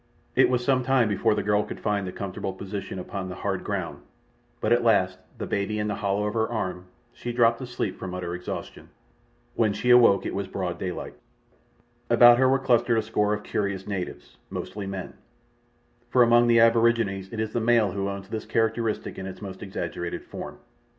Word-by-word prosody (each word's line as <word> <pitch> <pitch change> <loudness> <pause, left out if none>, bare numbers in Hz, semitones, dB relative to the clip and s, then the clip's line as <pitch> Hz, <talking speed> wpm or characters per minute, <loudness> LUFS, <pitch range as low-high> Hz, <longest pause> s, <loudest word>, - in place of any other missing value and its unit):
It - - +5
was 125 -1 0
some 130 -1 +3
time 130 -2 +3
before 105 +2 +2
the - - -1
girl 105 0 +2
could - - -7
find 100 -2 -1
a - - -4
comfortable 95 0 -5
position 95 0 -6
upon 95 0 -5
the 90 - -6
hard - - -3
ground, - - -4 0.6
but - - +2
at 120 0 +2
last, 95 -5 +3 0.2
the - - -4
baby 100 +2 -1
in 105 0 -1
the - - 0
hollow 100 +1 0
of 105 - -2
her 110 -1 0
arm, 90 -6 -3 0.3
she 120 - -5
dropped 115 0 +3
asleep 125 -6 -4
from 90 -1 -5
utter 90 -1 -4
exhaustion. 90 +1 -7 0.6
When 110 -3 +2
she 125 +4 +1
awoke 115 -6 +6
it - - -3
was 100 0 -3
broad 90 -2 -4
daylight. 90 -2 -4 1.0
About 120 0 +7
her 130 0 +5
were 135 - +4
clustered 120 -3 +2
a 110 - +1
score 105 -1 +1
of 105 - -8
curious 100 -2 -2
natives—mostly 100 +1 -6
men, 95 -2 -5 1.0
for 125 - +5
among 120 0 +5
the 115 -1 +5
aborigines 115 -4 +3
it 115 - -5
is 110 0 -2
the 120 - 0
male 115 -3 +3
who 100 +1 -2
owns 100 0 -6
this 110 +1 -5
characteristic 110 -2 -1
in 95 - -5
its 95 - -8
most 95 -3 -8
exaggerated 85 -3 -4
form. - - -8
105 Hz, 190 wpm, -26 LUFS, 95-115 Hz, 1.0 s, About